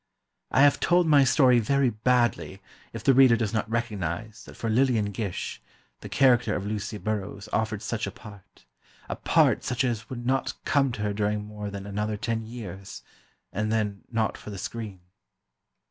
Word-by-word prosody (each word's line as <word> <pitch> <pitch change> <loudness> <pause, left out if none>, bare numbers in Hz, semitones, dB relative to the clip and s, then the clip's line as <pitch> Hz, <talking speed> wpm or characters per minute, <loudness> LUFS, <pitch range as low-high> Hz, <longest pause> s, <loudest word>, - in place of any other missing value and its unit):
I 135 - +4
have 145 -1 +5
told 175 0 +3
my 145 -3 +6
story 125 -1 +5
very 135 +3 +2
badly 120 -3 +1 0.3
if 115 -1 -7
the 135 - +5
reader 130 -2 +7
does 110 -2 -2
not 110 -1 -1
recognize 110 -3 -3
that - - -12
for 115 - -3
Lillian 115 -3 +2
Gish, 100 -3 -4 0.4
the - - -9
character 120 -5 +3
of 95 - -3
Lucy 105 +1 -3
Burrows 105 -1 -4
offered 110 -1 -1
such 115 +1 -2
a - - -4
part: 100 - -15 0.4
a - - -3
part - - +3
such 125 +1 -1
as 115 -3 -2
would 120 -2 -6
not 130 +1 0
come 135 -2 +2
to 110 -3 -4
her 105 -1 -1
during 105 0 -1
more 105 -1 -6
than 100 -1 -7
another 105 +1 -2
ten 115 +1 -3
years, 100 -5 -8 0.5
and 105 +2 -1
then, 105 -3 -1
not 110 -3 -1
for - - -10
the 100 - -6
screen. 105 -3 -6
110 Hz, 175 wpm, -26 LUFS, 105-120 Hz, 0.5 s, reader